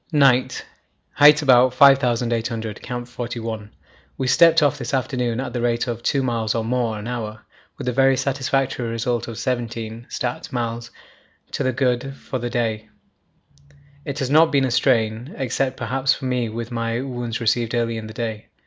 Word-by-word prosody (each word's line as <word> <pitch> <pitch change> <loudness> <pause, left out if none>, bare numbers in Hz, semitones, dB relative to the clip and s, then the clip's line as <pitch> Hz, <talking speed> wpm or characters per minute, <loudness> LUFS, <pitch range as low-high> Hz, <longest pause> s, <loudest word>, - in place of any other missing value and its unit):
Night. 130 -4 +3 0.5
Height 150 +1 +7
about 125 -2 +5
5800. 120 -5 +2
Camp 120 -1 -5
41. 115 -3 -5 0.5
We 135 - -2
stepped 165 +5 +5
off 145 0 +2
this 125 +1 -2
afternoon 125 -2 -1
at 130 - -4
the 120 - -2
rate 120 -1 +1
of 120 -2 -4
2 135 +3 +1
miles 115 -3 -1
or 115 -1 -1
more 120 -2 -1
an 105 +2 -7
hour, 110 -3 -5 0.4
with - - -6
the 125 - -1
very 135 +1 +4
satisfactory 135 -2 -1
result 115 +1 -2
of 115 -2 -7
17 115 -2 -4
(stat.) 125 -1 -4
miles 115 -1 -3 0.6
to - - -3
the 130 - +1
good 130 +1 -1
for 130 - -5
the 120 0 -3
day. 110 -3 -2 1.1
It 140 0 -5
has 135 -2 -2
not 160 +2 +5
been 140 -2 +3
a 130 - -1
strain, 115 0 +1
except 130 -1 -1
perhaps 135 +2 0
for 135 - -8
me 125 -3 -1
with 115 +2 -6
my 115 0 -2
wounds 120 -3 -4
received 115 +1 0
early 115 -1 0
in 110 -1 -6
the 110 - -9
day. 110 -3 -4
120 Hz, 175 wpm, -22 LUFS, 115-130 Hz, 1.1 s, Height